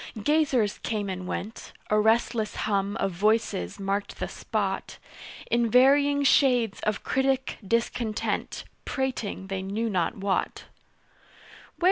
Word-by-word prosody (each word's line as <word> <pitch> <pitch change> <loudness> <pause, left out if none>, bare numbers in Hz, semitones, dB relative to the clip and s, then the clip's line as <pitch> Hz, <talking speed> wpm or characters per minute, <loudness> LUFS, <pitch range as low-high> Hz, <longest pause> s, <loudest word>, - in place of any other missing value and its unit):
Gazers 280 -8 +2
came 210 -3 -2
and 185 -1 -5
went 215 +5 -6 0.2
A 215 - +4
restless 220 0 +1
hum 200 0 0
of 195 - 0
voices 195 - 0
marked 200 +1 -2
the - - -2
spot - - -3 0.5
In 235 -1 +2
varying 280 +4 +5
shades 250 -6 +3
of 215 -1 -2
critic 265 0 0
discontent 230 +1 -1 0.2
Prating 250 -8 -3
they 190 0 -3
knew 210 +4 -2
not 180 -1 0
what. 195 0 -1
220 Hz, 115 wpm, -27 LUFS, 200-250 Hz, 0.5 s, varying